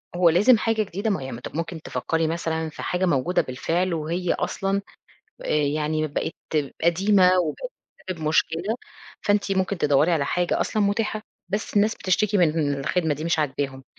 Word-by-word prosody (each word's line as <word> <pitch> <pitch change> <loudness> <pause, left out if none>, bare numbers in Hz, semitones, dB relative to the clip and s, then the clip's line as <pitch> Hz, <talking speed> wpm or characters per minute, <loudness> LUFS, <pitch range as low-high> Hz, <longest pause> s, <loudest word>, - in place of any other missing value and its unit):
هو 175 -1 +5
لازم 210 +9 +5
حاجة 220 0 +1
جديدة؟ 200 +2 -3
ما 200 - +2
هو - - -4
ي 135 0 -6 0.2
ممكن 165 0 -4
تفكّري 165 0 -1
مثلًا 160 -1 -2
في 155 - -9
حاجة 180 +1 0
موجودة 170 +2 +2
بالفعل 170 +8 -1
وهي 170 +3 -1
أصلًا 195 +1 -1 0.6
آآ - - -7
يعني 150 +1 +1
بقت 150 - -3 0.5
قديمة 185 +2 +4
وبقت - - -5 0.4
بتسبب 175 -3 -4
مشكلة، 165 +6 +1 0.5
فأنتِ 205 -1 +1
ممكن 190 0 0
تدوّري 150 +2 +3
على 145 -4 +2
حاجة 175 +4 0
أصلًا 215 - 0
متاحة، 215 +1 0 0.3
بس 205 +2 -3
الناس 210 +2 +4
بتشتكي 205 +2 +1
من 175 -3 +5
إن 145 -3 0
الخِدمة 160 +1 0
دي 155 +3 -6
مش 170 -1 +1
عاجباهم، 135 -2 -2
170 Hz, 165 wpm, -24 LUFS, 155-200 Hz, 0.6 s, هو